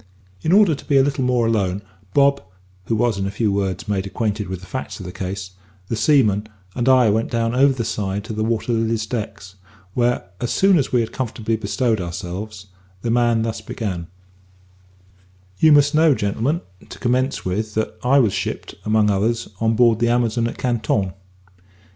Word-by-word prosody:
In 160 - 0
order 200 -3 +6
to 140 - -8
be 140 - +3
a 135 - +6
little 140 -1 0
more 125 -2 +2
alone, 100 -4 0 0.3
Bob 140 0 +4 0.4
(who 115 - 0
was, 110 -2 +1
in 95 - -1
a - - -2
few 105 +1 0
words, 100 +2 -2
made 100 -2 -1
acquainted 105 -1 -2
with 95 -1 -5
the - - -11
facts 130 +3 -6
of 95 - -8
the 90 - -6
case), 95 0 -5 0.4
the - - -1
seaman, 110 -6 +2 0.2
and 125 +1 0
I 125 -4 +5
went 110 +2 0
down 115 0 0
over 135 +2 +4
the 120 -3 -3
side 100 -2 -2
to 110 - -6
the 110 0 -1
Water 115 +1 -1
Lily's 115 -1 0
deck, 105 -4 -4 0.5
when, 120 0 +2 0.2
as 120 - -2
soon 190 -3 +4
as 135 - -1
we 125 - +3
had 115 - -3
comfortably 115 -3 -2
bestowed 110 -1 0
ourselves, 90 +4 -6 0.4
the 115 - 0
man 120 -1 +2
thus 115 -1 -3
began: 95 -7 -4 1.5
"You 160 - +6
must 145 0 +5
know, 155 -2 +5
gentlemen, 120 - -1 0.3
to - - -9
commence 130 +2 0
with, 105 +4 -2
that 110 - -1
I 130 +3 +4
was 115 -8 +3
shipped, - - -4
among 105 -1 +3
others, 110 +4 0
on 115 0 +1
board 115 -1 +4
the 120 0 +2
Amazon 120 -1 +1
at - - -6
Canton. 110 -6 0
115 Hz, 190 wpm, -21 LUFS, 105-125 Hz, 1.5 s, order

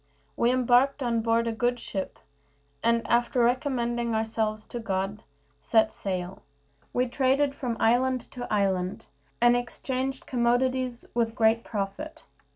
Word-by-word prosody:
We 235 - +2
embarked 255 +2 +3
on 230 -2 +1
board 230 +1 +2
a 230 - 0
good 245 +2 0
ship, 195 -4 -5 0.6
and, 230 0 +1
after 240 +1 +2
recommending 240 -2 0
ourselves 220 -1 -1
to 240 - -6
God, 195 -1 -2 0.4
set 220 -1 +3
sail. 185 -1 -4 0.5
We 250 - +1
traded 270 +3 +1
from 245 -5 -3
island 250 +2 +3
to 245 -1 -7
island, 190 -3 0 0.3
and 240 0 +5
exchanged 260 +2 -3
commodities 250 0 0
with 230 -1 0
great 230 -1 +3
profit. 210 +9 -5
235 Hz, 130 wpm, -27 LUFS, 220-255 Hz, 0.6 s, and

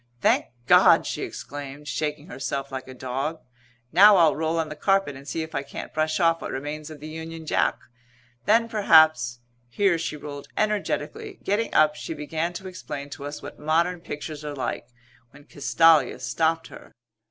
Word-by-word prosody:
"Thank - - +3 0.2
God!" - - +6
she - - -3
exclaimed, 145 +1 -7
shaking 150 +3 -3
herself 140 -5 -4
like 130 -1 -6
a 130 - -9
dog. 135 +5 -3 0.5
"Now 205 +2 +8
I'll 165 -3 +5
roll 160 +1 -1
on 160 -1 -1
the 150 - -6
carpet 195 -3 +1
and 135 +1 -12
see 160 - -2
if 160 - -10
I 140 - -1
can't 140 - -8
brush 155 +2 0
off 165 -1 +3
what - - -5
remains 150 +3 -5
of 155 -2 -10
the 150 - -8
Union 160 +1 -7
Jack. - - +1 0.7
Then 230 +2 +4
perhaps 155 - +4
" 120 - -40
here 175 - +2
she 155 -2 -3
rolled 145 -1 -8
energetically. 215 - -2
Getting 210 +3 0
up 155 -1 +5
she 160 - -6
began 160 +3 -2
to 190 +2 -7
explain 145 -6 -7
to 140 - -7
us 145 +1 -7
what - - -9
modern 170 +4 +1
pictures 150 -1 -7
are 150 -1 -5
like 130 -3 -4 0.4
when 145 +4 -17
Castalia 155 +2 +3
stopped 165 0 0
her. - - -13
155 Hz, 180 wpm, -25 LUFS, 145-165 Hz, 0.7 s, Now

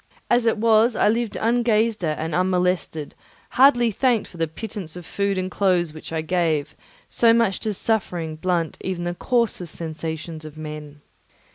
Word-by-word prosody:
As 240 -1 +3
it 225 - +2
was, 225 +1 +4
I - - +3
lived 230 0 0
ungazed 225 -2 +1
at 155 -2 0
and 160 +1 -3
unmolested, 180 -4 0 0.4
hardly 245 -3 +5
thanked 235 0 +1
for 175 - -13
the 165 -1 0
pittance 180 0 -7
of 180 -1 -9
food 200 +2 -1
and 185 0 -2
clothes 180 -5 +1
which 155 - -10
I 160 -1 -1
gave, 160 -3 0 0.3
so 230 -1 +4
much 230 -4 +2
does 215 -3 -3
suffering 175 -8 -1
blunt 170 0 -1
even 185 -2 -3
the 175 0 -2
coarsest 225 -5 -1
sensations 160 0 -5
of 155 0 -10
men. 150 -1 -8
185 Hz, 165 wpm, -23 LUFS, 160-225 Hz, 0.4 s, hardly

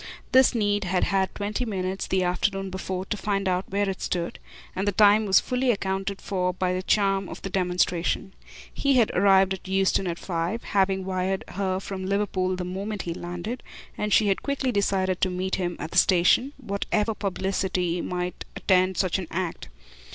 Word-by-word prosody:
This 260 -1 +5
need 205 -2 +1
had 180 0 +1
had 190 -1 0
twenty 210 +4 -2
minutes, 190 -4 -3
the 190 -1 +1
afternoon 190 +2 -1
before, 190 0 -4
to 210 - -2
find 195 -1 -1
out 185 0 -1
where 200 +1 0
it 190 -1 -3
stood, 170 -1 -2 0.4
and 195 +2 -2
the - - +3
time 210 +2 +5
was 190 - +6
fully 250 0 -1
accounted 195 -2 -1
for 180 -2 -1
by 180 0 0
the 185 - -1
charm 195 -1 +1
of - - -9
the 195 - -4
demonstration. 180 0 0 0.4
He 275 -1 +2
had 235 -4 +4
arrived 195 0 +4
at 190 - -8
Euston 190 0 +1
at 170 -1 -2
five, 175 +6 -3
having 190 -1 +1
wired 185 0 -1
her 190 -1 -1
from 190 -1 -5
Liverpool 190 -2 0
the 180 - -4
moment 195 +3 -4
he 170 - -3
landed, 175 +8 -5 0.3
and 210 0 -2
she 215 - +5
had 195 - +1
quickly 280 -2 -1
decided 190 -3 0
to 190 - +3
meet 185 +1 -2
him 175 -2 -2
at 160 - -5
the - - +5
station, 190 +9 +4
whatever 210 -2 -1
publicity 190 -3 -1
might 180 0 -3
attend 185 -1 +2
such 185 0 +1
an 180 - -5
act. 180 -1 -3
190 Hz, 185 wpm, -25 LUFS, 185-200 Hz, 0.4 s, was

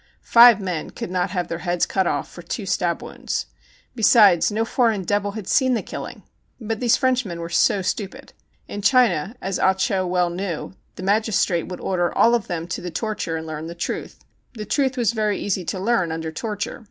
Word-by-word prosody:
Five 235 -2 +7
men 180 -5 -4
could - - -7
not 180 +1 0
have 180 -2 -2
their 170 -1 -4
heads 175 -1 0
cut 190 -2 0
off 145 - -1
for 175 - -11
two 195 +5 -5
stab 175 -2 -1
wounds. - - -4 0.5
Be 235 - -8
sides, 200 -6 +6
no 220 +2 0
foreign 225 -5 +1
devil 205 +2 -1
had 215 -3 -7
seen 260 -2 +3
the - - -2
killing. - - -8 0.4
But 225 -2 -4
these 240 -2 +3
Frenchmen 250 -9 0
vvere 170 0 -6
so 195 +2 +3
stupid. 190 +2 -4 0.3
In 205 - -6
China, 215 - +3
as 190 0 -2
Ah 190 0 +3
Cho 190 0 0
well 180 -1 +1
knew, 175 -2 -4 0.2
the - - -8
magistrate 200 -4 +1
would 180 - -7
order 175 -2 0
all 235 - +4
of 235 -4 0
them 170 -1 -4
to 170 - -4
the 180 - -5
torture 205 -2 -3
and 160 - -6
learn 155 0 -6
the 170 - -7
truth. - - -4 0.4
The 215 -2 -6
truth 270 0 0
was 235 -4 +2
very 215 -2 0
easy 195 -2 -2
to 190 - -3
learn 190 -5 +1
under 160 0 -4
torture. 205 +5 -4
190 Hz, 205 wpm, -22 LUFS, 175-220 Hz, 0.5 s, Five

